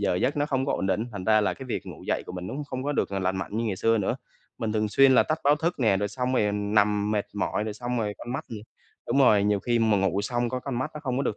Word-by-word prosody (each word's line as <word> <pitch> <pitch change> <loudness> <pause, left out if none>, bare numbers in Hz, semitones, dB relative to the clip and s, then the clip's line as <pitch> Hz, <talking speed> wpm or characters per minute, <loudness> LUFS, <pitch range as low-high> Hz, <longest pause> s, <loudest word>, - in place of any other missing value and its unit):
giờ 100 -3 +1
giấc 130 +11 0
nó 145 0 +1
không 135 -2 -1
có - - +1
ổn - - -1
định 100 - +1
ấy, 115 - -3
thành 100 -3 -6
ra 110 +1 +4
là 105 - 0
cái 130 - -9
việc 125 - -4
ngủ - - -9
dậy - - 0
của - - -7
mình 90 0 -6
nó 95 - -5
cũng 150 +2 -4
không 130 -2 -5
có 145 - 0
được, - - 0
ờ, - - -4
là - - -3
lành 95 0 0
mạnh 95 +3 -4
như 115 - 0
ngày 105 -4 -1
xưa 115 +3 +2
nữa. 100 - 0 0.4
Mình 110 -2 -2
thường 110 0 0
xuyên 135 +4 +5
là - - +7
tắt 155 0 -1
báo 145 +1 +5
thức 170 +4 -1
nè, 110 -5 +4
rồi 100 +1 -1
xong 125 +5 -2
rồi 105 -4 +2
nằm 105 0 +1
mệt 105 -1 0
mỏi, 105 +1 -1
rồi 110 -1 -4
xong 120 +2 -3
rồi 105 -2 -2
con 120 - -6
mắt 140 +4 -3
thì 110 -3 -6 0.5
đúng - - +1
rồi, 105 -7 +5
nhiều 105 -1 +2
khi 120 +2 +1
mà 110 -2 +3
ngủ 95 0 +1
xong 120 +2 -1
có 125 +1 -3
con 125 -2 -4
mắt 130 +4 -2
nó 150 - -6
không 130 -4 -2
có 135 - 0
được 110 - -1
110 Hz, 340 wpm, -26 LUFS, 105-130 Hz, 0.5 s, là